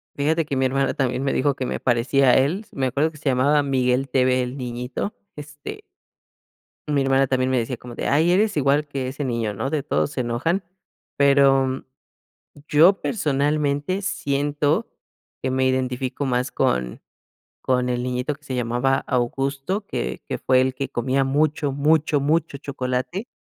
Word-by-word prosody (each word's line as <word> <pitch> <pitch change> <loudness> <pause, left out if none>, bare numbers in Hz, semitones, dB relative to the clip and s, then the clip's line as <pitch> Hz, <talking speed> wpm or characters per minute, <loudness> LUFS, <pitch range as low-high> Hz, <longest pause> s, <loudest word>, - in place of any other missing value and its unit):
Fíjate 155 +3 +1
que 140 - -3
mi 130 0 +1
hermana 135 +1 +1
también 130 -1 -1
me 135 - 0
dijo 140 +1 +1
que 130 - -3
me - - -2
aparecía 130 +2 +2
a - - +6
él, 160 +11 +1
me 135 -2 -2
acuerdo 145 +5 0
que 155 - -15
se 150 - -19
llamaba 140 +3 +3
Miguel 130 -1 +1
TV 130 -1 +2
el 125 +1 -5
niñito, 125 - -4 0.2
este 150 - -9 1.1
Mi 145 -2 +1
hermana 135 0 +3
también 130 0 0
me 130 - +1
decía 120 +1 -2
como 120 0 -10
de: - - -3
"Ay 160 +5 +3
eres 205 +2 +2
igual 145 +2 +2
que 135 -2 -3
ese 140 +2 -4
niño, 115 -4 -1
¿no?, 135 +8 -3
de 155 -2 0
todos 145 - -1
se 130 - -2
enojan", 145 +11 -1 0.5
pero, 135 -1 +4 0.8
yo 170 +7 +5
personalmente, 145 +1 0
siento 145 -4 0 0.5
que 130 - -1
me 130 0 +1
identifico 130 +1 -1
más 125 -1 0
con 60 -1 -1 0.6
con 125 -1 +1
el 125 0 -1
niñito 125 +3 -2
que 145 - -27
se 135 - -6
llamaba 125 +2 +1
Augusto, 135 - -1
que 60 - -4
que - - -2
fue 130 0 +3
el 130 0 0
que 135 0 -3
comía 130 +2 0
mucho, 145 +1 +1
mucho, 150 0 +2
mucho 155 0 0
chocolate. 135 - -3
135 Hz, 170 wpm, -23 LUFS, 130-145 Hz, 1.1 s, a